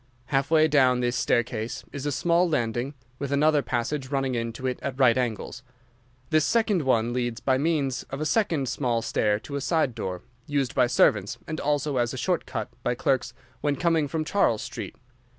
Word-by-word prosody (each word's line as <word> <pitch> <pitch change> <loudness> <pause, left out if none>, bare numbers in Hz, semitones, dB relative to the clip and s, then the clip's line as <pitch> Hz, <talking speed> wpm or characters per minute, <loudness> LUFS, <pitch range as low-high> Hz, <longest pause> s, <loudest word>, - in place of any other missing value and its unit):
Half 135 0 +2
way 160 -1 +5
down 130 -4 +4
this 120 0 0
staircase 120 +1 -1
is 145 0 -5
a - - 0
small 170 +5 +2
landing, 120 0 -1 0.2
with 140 -1 -3
another 150 +1 +3
passage 130 +2 -2
running 135 -2 0
into 115 +1 -3
it 130 -1 -1
at 135 0 -4
right 125 -3 +5
angles. 120 -1 -3 0.7
This 155 -1 +4
second 215 -4 +2
one 120 -4 +1
leads 120 -2 -2
by 130 -1 +1
means 140 -4 0
of 135 - -5
a 155 - -2
second 160 - +1
small 120 -2 -1
stair 105 -2 +1
to 140 - -7
a - - -3
side 155 -4 +1
door, 95 -5 -5 0.2
used 140 -4 0
by 125 - +3
servants, 105 -4 +2
and 155 - -4
also 145 -1 0
as 120 -1 0
a - - -6
short - - -1
cut - - -4
by 120 - 0
clerks 125 -1 0 0.3
when 145 -1 +1
coming 165 -3 +1
from 155 +2 -2
Charles 155 - +2
Street. - - -6
135 Hz, 190 wpm, -26 LUFS, 120-150 Hz, 0.7 s, way